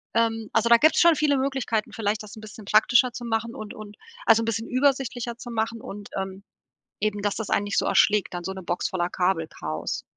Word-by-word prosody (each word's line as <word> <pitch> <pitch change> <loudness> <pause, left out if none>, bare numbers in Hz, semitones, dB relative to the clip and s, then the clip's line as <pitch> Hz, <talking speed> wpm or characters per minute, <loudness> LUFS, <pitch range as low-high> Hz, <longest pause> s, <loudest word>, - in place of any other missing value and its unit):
Ähm, 225 -1 +1
also 235 +1 +2
da 235 - +8
gibt's 310 +6 +4
schon 340 -1 +6
viele 290 -2 +2
Möglichkeiten, 265 -5 -1
vielleicht 215 -1 -1
das 210 - -11
'n - - -10
bisschen 215 0 -11
praktischer 240 +5 +4
zu 240 - -7
machen 230 +2 -2
und 215 -3 -7
und 210 -1 -11 0.3
also 225 0 +5
'n - - -3
bisschen 225 0 -2
übersichtlicher 255 -3 0
zu 240 - -9
machen 225 0 -2
und 205 0 -9
ähm 190 0 -5 0.6
eben, 210 -1 -1
dass 205 -1 -1
das 220 - -4
einen 200 - +2
nicht 205 - -1
so - - +1
erschlägt, 205 -4 +3
dann 175 - -4
so 190 - -3
'ne 190 -1 -8
Box 175 +1 -2
voller 175 -2 -1
Kabelchaos. 165 - -2
220 Hz, 220 wpm, -25 LUFS, 205-235 Hz, 0.6 s, da